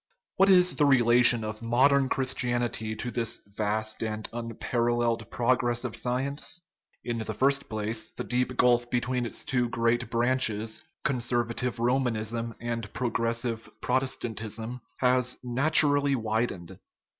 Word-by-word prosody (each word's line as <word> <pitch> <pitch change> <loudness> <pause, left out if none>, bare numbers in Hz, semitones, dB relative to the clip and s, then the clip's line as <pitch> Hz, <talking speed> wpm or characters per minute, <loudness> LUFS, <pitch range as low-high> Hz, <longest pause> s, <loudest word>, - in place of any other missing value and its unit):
What 195 +1 +5
is 180 -1 +6
the 150 - +4
relation 120 -3 +5
of 110 +1 -5
modern 130 +4 +3
Christianity 120 -4 -1
to 120 +3 -4
this 115 -1 -1
vast 110 +1 -2
and 110 -1 -3
unparalleled 115 0 -1
progress 120 0 +1
of 125 -3 -4
science? 140 +6 -2 0.4
In 120 -1 -3
the 110 -1 -4
first 140 +4 +1
place, 110 +1 -3
the - - -7
deep 125 0 -1
gulf 120 -1 +3
between 125 0 -1
its - - -4
two 125 -2 0
great 115 0 0
branches, 115 -1 +1 0.2
conservative 120 -1 -1
Romanism 115 -2 -1
and 115 -3 -4
progressive 115 -1 -2
Protestant 130 -3 -1
ism, 115 +3 -4 0.2
has 125 0 +2
naturally 145 +2 +3
widened. 110 -6 -3
120 Hz, 125 wpm, -27 LUFS, 115-125 Hz, 0.4 s, is